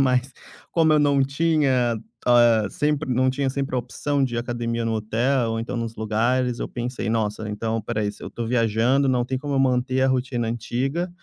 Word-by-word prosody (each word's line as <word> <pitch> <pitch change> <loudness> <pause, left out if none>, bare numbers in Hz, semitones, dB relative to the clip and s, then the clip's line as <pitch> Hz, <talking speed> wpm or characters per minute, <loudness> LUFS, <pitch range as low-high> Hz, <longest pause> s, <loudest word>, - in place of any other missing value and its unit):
mas 130 0 +2 0.4
como 160 -2 +4
eu 150 - +5
não 140 -2 +3
tinha, 140 -5 +1 0.3
ah, 120 -3 +5
sempre 150 +4 -1
não 130 +1 +2
tinha 135 +1 -1
sempre 135 -1 -2
a - - +2
opção 135 +3 -1
de 120 -2 -3
ir - - 0
à - - +1
academia 120 -1 -3
no 115 - 0
hotel 115 +3 0
ou 115 - -2
então 120 +2 -4
nos 115 -1 -3
lugares, 120 +3 0
eu - - -3
pensei: 120 -1 -4
"Nossa, 110 -1 -1
então 110 +2 -2
espera 110 0 -3
aí. 105 -1 0
Se - - -16
eu - - -5
estou 115 -1 -5
viajando, 120 +3 +2
não 125 -2 +2
tem 130 +1 -2
como 145 +1 -3
eu 135 - +2
manter 130 0 +1
a 135 - +3
rotina 125 -3 -1
antiga, 135 +9 -2
125 Hz, 215 wpm, -23 LUFS, 115-135 Hz, 0.4 s, eu